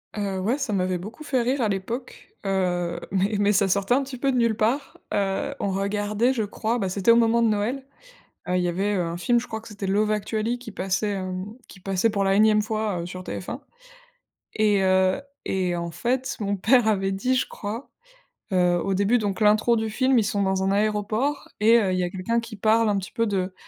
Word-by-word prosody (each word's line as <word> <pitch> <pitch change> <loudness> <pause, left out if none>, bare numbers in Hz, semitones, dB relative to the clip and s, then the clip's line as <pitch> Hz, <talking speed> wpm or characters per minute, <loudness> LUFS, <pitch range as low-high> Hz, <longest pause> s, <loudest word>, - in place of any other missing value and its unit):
Heu, 200 -2 -2
ouais 225 +9 0
ça 250 -7 -2
m'avait 185 -1 0
beaucoup 225 - -9
fait 265 -4 0
rire 255 +4 0
à 220 - +1
l'époque, 230 +6 -5 0.2
heu, 180 -3 0
mais 195 +3 +1
mais 205 0 +3
ça 200 -1 +3
sortait 200 +5 +2
un 275 - +1
petit 260 -1 -7
peu 270 +1 +1
de 255 - 0
nulle 230 -2 +2
part. 240 +7 -1 0.2
Heu, 200 +9 -1
on 200 - -1
regardait 205 +5 0
je 225 -4 -1
crois, 220 +3 -2
bah, 195 -5 -1
c'était 195 +3 0
au 230 - +7
moment 235 0 +3
de 230 - +4
Noël. 220 +6 -1 0.7
Heu, 180 - +1
il 180 - +1
y 175 - +1
avait, 195 +4 0
heu, 185 - +1
un 165 0 -4
film 240 +7 +2
je 240 - -4
crois 220 0 -5
que 230 - -13
c'était 205 -2 -6
Love 210 +2 +1
Actually 215 +3 -1
qui 240 -3 -10
passait, 195 +2 -1
hem, 185 -1 -4 0.2
qui 190 - -13
passait 195 +4 0
pour 200 -1 0
la 195 0 +3
énième 210 0 +4
fois, 215 -4 -2
heu, 170 - -5
sur 185 +1 -7
TF1. - - -6 1.0
Et, 210 -2 +3
heu 185 +4 +3 0.2
et 185 -2 0
en 170 0 -3
fait 255 +7 -1
mon 200 -1 -1
père 235 +3 +4
avait 195 -2 +1
dit, 250 +7 0
je 255 - 0
crois, 225 +5 -6 0.6
heu, 180 -1 +3
au 195 - 0
début 200 +5 +3
donc 205 -2 -2
l'intro 215 +3 +4
du 220 0 -1
film, 255 +3 +2
ils 220 - +2
sont 200 0 0
dans 190 0 0
un 190 - +1
aéroport 215 +7 0
et, 225 +2 +6
heu, 190 -3 0
il - - 0
y - - +1
a 175 - -1
quelqu'un 195 +6 -1
qui 230 -1 -8
parle 220 +2 +3
un 205 - +1
petit 190 -1 -5
peu 230 - 0
de 190 -3 -1
210 Hz, 230 wpm, -24 LUFS, 190-230 Hz, 1.0 s, au